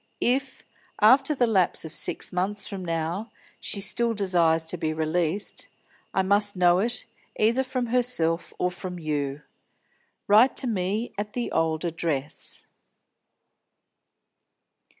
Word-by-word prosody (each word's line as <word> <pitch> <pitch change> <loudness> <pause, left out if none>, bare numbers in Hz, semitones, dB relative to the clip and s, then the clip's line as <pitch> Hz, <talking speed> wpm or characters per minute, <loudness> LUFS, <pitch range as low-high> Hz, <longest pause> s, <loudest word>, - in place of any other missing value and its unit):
If 260 +2 -1 0.4
after 270 +7 +5
the 250 - +3
lapse 190 -7 +1
of 160 - -8
six - - 0
months 195 +3 -1
from 195 -3 -6
now 170 +5 -3 0.3
she 200 - -3
still 230 +4 +1
desires 170 -5 +2
to 160 - -2
be 155 -1 -2
released, 160 +4 0 0.4
I 190 - +1
must 205 +1 +3
know 180 -1 +4
it, 235 +4 +2 0.3
either 235 +5 +3
from 255 -1 -2
herself 235 -9 +1
or 180 - 0
from 180 0 -7
you. 150 -3 -3 0.8
Write 220 +6 +5
to - - +2
me 210 +1 -2
at 210 0 -4
the 245 -1 -3
old 160 +1 0
address." 160 -4 -3
190 Hz, 130 wpm, -25 LUFS, 165-225 Hz, 0.8 s, after